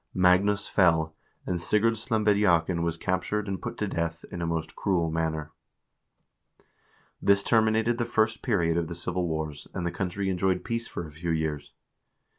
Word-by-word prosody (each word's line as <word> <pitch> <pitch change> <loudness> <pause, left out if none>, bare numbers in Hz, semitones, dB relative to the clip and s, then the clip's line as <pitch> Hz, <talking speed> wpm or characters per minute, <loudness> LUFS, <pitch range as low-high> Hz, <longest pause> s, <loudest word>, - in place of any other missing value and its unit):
Magnus 95 +3 +3
fell, 80 -4 +3 0.3
and 90 -2 -2
Sigurd 105 +5 +2
Slembediakn 105 -7 +2
was 85 0 -1
captured 95 +4 -1
and 95 -1 -3
put - - -5
to 105 - -1
death 85 -2 -3
in 90 - -5
a 85 - -1
most 80 -1 -3
cruel 85 -5 0
manner. 80 -1 -2 1.7
This 100 0 +4
terminated 110 +1 +2
the 120 - +1
first 110 -1 +1
period 85 -8 +1
of 85 -1 0
the 85 - -6
civil 90 +1 -2
wars, 80 -2 -4
and 85 - -2
the 85 - 0
country 95 +1 -2
enjoyed 95 0 0
peace 115 0 -3
for 85 - -5
a 75 - -10
few 80 +3 -5
years. 75 -3 -2
90 Hz, 165 wpm, -27 LUFS, 80-105 Hz, 1.7 s, This